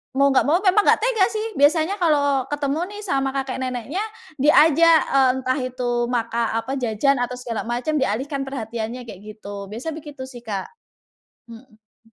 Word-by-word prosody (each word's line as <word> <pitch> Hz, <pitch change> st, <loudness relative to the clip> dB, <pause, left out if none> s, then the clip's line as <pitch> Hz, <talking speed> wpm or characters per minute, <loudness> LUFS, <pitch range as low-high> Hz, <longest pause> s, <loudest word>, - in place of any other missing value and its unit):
mau 280 Hz, 0 st, +4 dB
nggak 265 Hz, -, +3 dB
mau 315 Hz, +4 st, +4 dB
memang 380 Hz, 0 st, +4 dB
nggak -, -, +5 dB
tega 455 Hz, -6 st, +3 dB
sih, 435 Hz, 0 st, -3 dB
biasanya 320 Hz, +7 st, +3 dB
kalau 285 Hz, -5 st, +2 dB
ketemu 290 Hz, 0 st, -2 dB, 0.2 s
nih 415 Hz, -, -7 dB
sama 275 Hz, -8 st, 0 dB
kakek 265 Hz, -1 st, -3 dB
neneknya, 255 Hz, -, -3 dB, 0.4 s
diajak, 315 Hz, +3 st, +6 dB
eee, 270 Hz, -1 st, +4 dB
entah 255 Hz, +2 st, 0 dB
itu 255 Hz, -1 st, -3 dB, 0.2 s
maka 235 Hz, -1 st, -1 dB
apa 255 Hz, +4 st, -2 dB
jajan 245 Hz, +3 st, +1 dB
atau 245 Hz, 0 st, -2 dB
segala 240 Hz, -3 st, -5 dB
macem, 250 Hz, +6 st, -1 dB
dialihkan 270 Hz, +4 st, -2 dB
perhatiannya 235 Hz, -1 st, -5 dB
kayak 210 Hz, -6 st, -10 dB, 0.2 s
gitu, 200 Hz, -2 st, -8 dB
biasa 235 Hz, +11 st, -5 dB
begitu 295 Hz, -3 st, -8 dB
sih, 260 Hz, -2 st, -9 dB
Kak. 210 Hz, -5 st, -5 dB, 0.8 s
Mhm. 225 Hz, -1 st, -18 dB
265 Hz, 165 wpm, -22 LUFS, 235-295 Hz, 0.8 s, diajak